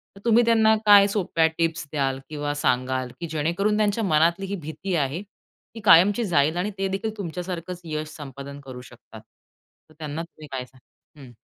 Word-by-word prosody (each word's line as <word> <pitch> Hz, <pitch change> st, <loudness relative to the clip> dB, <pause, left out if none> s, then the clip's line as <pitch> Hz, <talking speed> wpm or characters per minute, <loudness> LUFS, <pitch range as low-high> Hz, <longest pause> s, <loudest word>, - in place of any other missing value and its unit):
तर 195 Hz, -, -13 dB
तुम्ही 235 Hz, +1 st, +5 dB
त्यांना 220 Hz, -1 st, +4 dB
काय 205 Hz, -1 st, +8 dB
सोप्या 180 Hz, -5 st, +1 dB
टिप्स 165 Hz, -2 st, -1 dB
द्याल? 135 Hz, -3 st, -1 dB
किंवा 145 Hz, -1 st, -3 dB
सांगाल? 130 Hz, -2 st, 0 dB
की 170 Hz, -, -4 dB
जेणेकरून 170 Hz, +7 st, 0 dB
त्यांच्या 215 Hz, +1 st, +1 dB
मनातली 170 Hz, +2 st, +2 dB
ही 200 Hz, -, -3 dB
भीती 175 Hz, +2 st, -5 dB
आहे, 150 Hz, +4 st, -1 dB, 0.5 s
ती -, -, -7 dB
कायमची 195 Hz, +6 st, +6 dB
जाईल 160 Hz, -2 st, +2 dB
आणि 205 Hz, +4 st, -1 dB
ते 195 Hz, 0 st, -1 dB
देखील 195 Hz, +3 st, -3 dB
तुमच्यासारखंच 180 Hz, -1 st, -5 dB
यश 155 Hz, -1 st, -4 dB
संपादन 140 Hz, -1 st, -9 dB
करू 125 Hz, -2 st, -8 dB
शकतात. 125 Hz, -, -14 dB, 0.7 s
तर -, -, -19 dB
त्यांना 155 Hz, +1 st, -4 dB
तुम्ही 155 Hz, -3 st, -13 dB
काय 130 Hz, -1 st, -4 dB
सांग 130 Hz, +1 st, -22 dB, 0.5 s
हं. 120 Hz, -, -15 dB
165 Hz, 175 wpm, -24 LUFS, 145-195 Hz, 0.7 s, काय